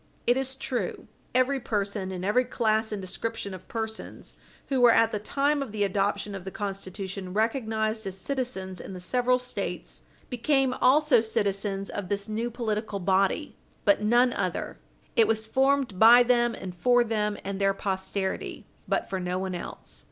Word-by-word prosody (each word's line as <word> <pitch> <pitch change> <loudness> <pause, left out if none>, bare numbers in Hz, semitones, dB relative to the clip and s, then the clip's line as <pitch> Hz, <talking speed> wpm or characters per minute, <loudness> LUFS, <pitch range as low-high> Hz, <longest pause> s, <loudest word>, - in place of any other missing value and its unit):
It 245 - +4
is 265 0 -1
true, 245 -7 -3 0.3
every 260 +2 +3
person, 200 -4 -2
and 185 0 -4
every 215 +6 +3
class 220 -3 0
and 210 - -3
description 200 +2 -4
of 185 - -10
persons 220 -1 -5 0.3
who 265 -2 +1
were, 245 - +8
at 230 0 +4
the 210 - -2
time 285 +7 +1
of 270 -6 -4
the 210 -1 0
adoption 200 +1 0
of 195 -2 -6
the 190 - -5
Constitution, 195 -1 -5
recognised 220 -1 0
as 190 0 -4
citizens 195 -7 -3
in 195 - -8
the 185 - -7
several 250 +6 +2
States 250 0 -4 0.3
became 265 +1 +1
also 270 -2 +5
citizens 200 -2 -1
of 195 -3 -5
this 200 +1 -2
new 225 +2 -2
political 220 -3 -2
body, 195 - +1 0.3
but 200 0 +4
none 240 +3 +4
other; - - -3 0.4
it 225 -3 +5
was 220 0 +1
formed 265 -4 +1
by 240 +2 +9
them, 240 -1 +2
and 185 -1 -7
for 245 +6 +4
them 210 -2 -1
and 195 0 -4
their 195 0 +3
posterity, 190 0 -3 0.2
but - - 0
for 190 - -3
no 180 0 -2
one 190 0 -3
else. 175 - -6
220 Hz, 170 wpm, -27 LUFS, 195-245 Hz, 0.4 s, by